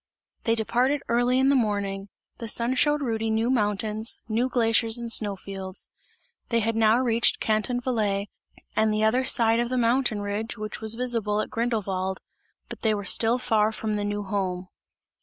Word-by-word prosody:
They 230 Hz, -, +3 dB
departed 250 Hz, +5 st, +1 dB
early 245 Hz, +2 st, +2 dB
in 265 Hz, +1 st, +3 dB
the 280 Hz, -, +4 dB
morning; 200 Hz, -4 st, -1 dB, 0.3 s
the 230 Hz, -, -5 dB
sun 235 Hz, +3 st, 0 dB
showed 295 Hz, +2 st, +2 dB
Rudy 225 Hz, -3 st, -1 dB
new 225 Hz, +3 st, +1 dB
mountains, 215 Hz, -1 st, 0 dB
new 235 Hz, +3 st, 0 dB
glaciers 225 Hz, -1 st, +2 dB
and 235 Hz, -1 st, -4 dB
snow 205 Hz, -3 st, +2 dB
fields; 190 Hz, 0 st, -8 dB, 0.6 s
they 235 Hz, -, +2 dB
had 225 Hz, +1 st, -1 dB
now 220 Hz, 0 st, +4 dB
reached 235 Hz, -2 st, +2 dB
Canton 220 Hz, +3 st, 0 dB
Valais 210 Hz, -5 st, -1 dB, 0.5 s
and 220 Hz, 0 st, +2 dB
the 215 Hz, 0 st, 0 dB
other 235 Hz, +4 st, +3 dB
side 230 Hz, -3 st, +3 dB
of 240 Hz, 0 st, -1 dB
the 255 Hz, -, -1 dB
mountain 240 Hz, -2 st, +1 dB
ridge 205 Hz, +3 st, -4 dB
which 215 Hz, 0 st, -6 dB
was 220 Hz, 0 st, 0 dB
visible 230 Hz, -4 st, -1 dB
at -, -, -3 dB
Grindelwald, 195 Hz, -5 st, -2 dB, 0.5 s
but -, -, -8 dB
they 220 Hz, -2 st, +2 dB
were 205 Hz, -1 st, -5 dB
still 225 Hz, +5 st, +4 dB
far 220 Hz, -3 st, +1 dB
from 220 Hz, -1 st, -3 dB
the 205 Hz, -1 st, -1 dB
new 205 Hz, 0 st, -2 dB
home. 185 Hz, -2 st, -3 dB
225 Hz, 175 wpm, -25 LUFS, 210-240 Hz, 0.6 s, the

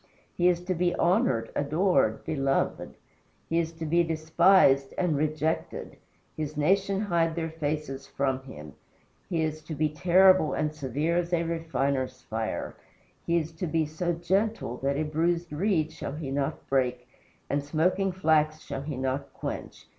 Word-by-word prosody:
He 175 Hz, -, +3 dB
is 175 Hz, -1 st, +1 dB
to 185 Hz, +1 st, -1 dB
be 175 Hz, 0 st, +1 dB
honored, 170 Hz, -, +2 dB
adored, 145 Hz, -, +1 dB
beloved; 135 Hz, -2 st, -1 dB, 0.5 s
he 165 Hz, -, +1 dB
is 165 Hz, -1 st, -1 dB
to 165 Hz, 0 st, -6 dB
be 170 Hz, +3 st, +3 dB
despised 160 Hz, -3 st, +4 dB
and 180 Hz, -4 st, +1 dB
rejected 155 Hz, +2 st, -2 dB, 0.4 s
his 155 Hz, -1 st, -4 dB
nation 195 Hz, +5 st, +2 dB
hide 170 Hz, -5 st, +1 dB
their 165 Hz, -1 st, -3 dB
faces 150 Hz, -3 st, -3 dB
from 135 Hz, -1 st, -1 dB
him. 75 Hz, -, -10 dB, 0.6 s
He 165 Hz, -3 st, 0 dB
is 155 Hz, 0 st, -2 dB
to 155 Hz, 0 st, -6 dB
be 155 Hz, +1 st, +1 dB
terrible 180 Hz, +2 st, +5 dB
and 150 Hz, 0 st, -1 dB
severe 150 Hz, +4 st, -1 dB
as 175 Hz, 0 st, -1 dB
a 170 Hz, -1 st, +2 dB
refiner's 140 Hz, -6 st, -2 dB
fire; 110 Hz, 0 st, -3 dB, 0.5 s
he 170 Hz, 0 st, +3 dB
is 160 Hz, -1 st, -2 dB
to 165 Hz, +2 st, -4 dB
be 160 Hz, 0 st, +1 dB
so 160 Hz, +3 st, -2 dB
gentle 190 Hz, -, -1 dB
that 140 Hz, +1 st, -1 dB
a 155 Hz, -, +1 dB
bruised 165 Hz, +2 st, 0 dB
reed 165 Hz, -1 st, +1 dB
shall 140 Hz, -, -6 dB
he 150 Hz, -3 st, -5 dB
not 140 Hz, 0 st, -2 dB
break, 125 Hz, -2 st, 0 dB, 0.4 s
and 140 Hz, 0 st, -1 dB
smoking 180 Hz, +6 st, +1 dB
flax 155 Hz, -4 st, +2 dB
shall 135 Hz, -, -5 dB
he 140 Hz, -1 st, -5 dB
not 135 Hz, +2 st, -2 dB
quench. -, -, -6 dB
155 Hz, 160 wpm, -28 LUFS, 140-170 Hz, 0.6 s, terrible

